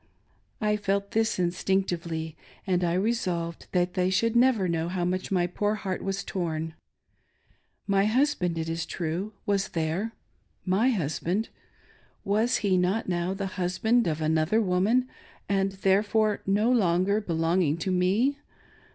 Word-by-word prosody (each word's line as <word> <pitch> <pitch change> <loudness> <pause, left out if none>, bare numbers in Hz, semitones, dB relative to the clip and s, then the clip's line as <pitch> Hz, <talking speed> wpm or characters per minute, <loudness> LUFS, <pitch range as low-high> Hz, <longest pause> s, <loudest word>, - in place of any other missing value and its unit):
I 210 -1 +1
felt 200 -1 -1
this 225 0 +1
instinctively, 175 -3 -1 0.3
and 180 -2 +1
I 170 -1 +1
resolved 180 -5 -1
that 180 -1 +1
they 185 0 +1
should 230 +5 +1
never 235 -6 +4
know 165 0 -1
how 180 -1 -1
much 185 +2 -2
my 180 -2 +2
poor 205 +4 -1
heart 190 -3 -4
was 195 0 -2
torn. 160 -3 -3 1.1
My 195 -1 +2
husband, 215 - +1
it 160 0 -2
is 165 0 -3
true, 175 +6 -3
was 200 -1 +1
there. 170 +7 -2 0.5
My 200 +7 +3
husbaq^! 185 - -1 0.8
Was 215 +5 +2
he 190 -2 +3
not 190 +5 0
now 175 +1 -1
the 195 0 -3 0.2
husband 220 +5 +2
of 155 -1 -1
an 155 +1 +2
other 170 +8 +2
woman, 210 +6 +2 0.4
and, 195 -1 +1
therefore, 205 +2 +2
no 210 +5 +3
longer 200 -2 +2
belonging 165 -3 +1
to 190 +3 -2
me. 205 +11 +2
190 Hz, 145 wpm, -27 LUFS, 175-210 Hz, 1.1 s, never